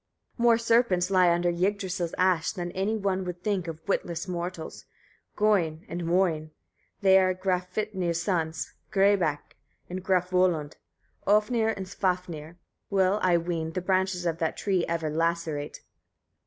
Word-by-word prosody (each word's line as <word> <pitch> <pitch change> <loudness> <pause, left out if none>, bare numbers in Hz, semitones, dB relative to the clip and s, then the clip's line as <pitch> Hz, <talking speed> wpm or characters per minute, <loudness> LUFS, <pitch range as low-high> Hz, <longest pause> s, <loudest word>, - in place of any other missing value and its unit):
34. 235 - -2
More 235 -1 +6
serpents 230 -6 +2
lie 185 -2 +5
under 175 +1 +2
Yggdrasil's 185 -1 -1
ash, 180 -3 +2
than 175 -3 -4
any 200 +5 -1
one 195 -2 -1
would 180 -1 -6
think 195 -5 -1
of 160 +2 -8
witless 170 -3 -2
mortals: 175 -2 -5 0.5
Gôin 180 -7 +1
and 175 - -5
Môin, 165 -3 +1 0.5
they 190 -1 +6
are 185 -1 +2
Grafvitnir's 185 -1 -1
sons 165 -3 -2 0.2
Grâbak 195 -7 +2 0.4
and 185 0 -4
Grafvöllud, 180 -4 +1 0.5
Ofnir 220 +2 +3
and 190 - -4
Svafnir, 180 -4 -3 0.3
will, 195 0 +2
I 180 -2 +4
ween, 165 -1 -3
the 185 - -1
branches 185 -1 0
of 165 -1 -1
that 160 -2 -1
tree 190 -4 0
ever 165 -2 -1
lacerate. 165 -2 -2
180 Hz, 140 wpm, -27 LUFS, 170-195 Hz, 0.5 s, More